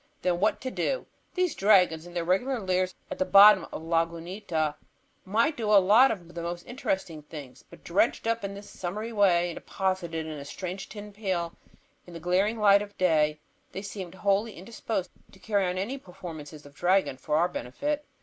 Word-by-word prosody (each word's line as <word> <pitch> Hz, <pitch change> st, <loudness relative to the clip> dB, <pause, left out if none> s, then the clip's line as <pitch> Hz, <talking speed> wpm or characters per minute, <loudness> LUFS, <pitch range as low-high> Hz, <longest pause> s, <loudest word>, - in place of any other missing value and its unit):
Then, 180 Hz, -1 st, +1 dB
what 210 Hz, +3 st, +2 dB
to 260 Hz, -, -4 dB
do? -, -, -1 dB, 0.3 s
These 365 Hz, -3 st, +1 dB
dragons 180 Hz, -5 st, +3 dB
in 175 Hz, -, -13 dB
their 170 Hz, -, 0 dB
regular 240 Hz, +9 st, +1 dB
lairs 185 Hz, -2 st, 0 dB, 0.2 s
at -, -, -5 dB
the -, -, +4 dB
bottom 195 Hz, 0 st, +7 dB
of -, -, -6 dB
Lagunita 165 Hz, 0 st, -1 dB, 0.5 s
might 230 Hz, +10 st, +2 dB
do 225 Hz, -5 st, -2 dB
a 210 Hz, -, +8 dB
lot 210 Hz, +8 st, +6 dB
of 175 Hz, -4 st, -6 dB
most 170 Hz, +1 st, -5 dB
interesting 190 Hz, -, -3 dB
things, 145 Hz, -3 st, -10 dB
but -, -, -15 dB
dredged 200 Hz, +6 st, +1 dB
up 230 Hz, -1 st, 0 dB
in 200 Hz, 0 st, -4 dB
this 200 Hz, +1 st, -10 dB
summary 210 Hz, +6 st, -5 dB
way 180 Hz, -4 st, +3 dB
and -, -, -8 dB
deposited 175 Hz, -4 st, -2 dB
in 155 Hz, -2 st, -6 dB
a -, -, -7 dB
strange 185 Hz, +6 st, -6 dB
tin 210 Hz, -1 st, -9 dB
pail 185 Hz, -5 st, -2 dB, 0.5 s
in 175 Hz, -, -11 dB
the -, -, -6 dB
glaring 185 Hz, +6 st, +1 dB
light 200 Hz, -2 st, +5 dB
of 205 Hz, 0 st, -8 dB
day, 155 Hz, -4 st, +2 dB, 0.3 s
they 195 Hz, -, -5 dB
seemed 190 Hz, -3 st, -7 dB
wholly 200 Hz, +3 st, +1 dB
indisposed 195 Hz, 0 st, -4 dB, 0.2 s
to -, -, -15 dB
carry 200 Hz, -1 st, 0 dB
on 180 Hz, +1 st, -2 dB
any 235 Hz, +9 st, -3 dB
performances 160 Hz, -, -10 dB
of 145 Hz, -, -14 dB
dragon 180 Hz, -1 st, +2 dB
for 150 Hz, +3 st, -1 dB
our 170 Hz, +2 st, +3 dB
benefit. 285 Hz, -, -3 dB
185 Hz, 190 wpm, -28 LUFS, 170-210 Hz, 0.5 s, a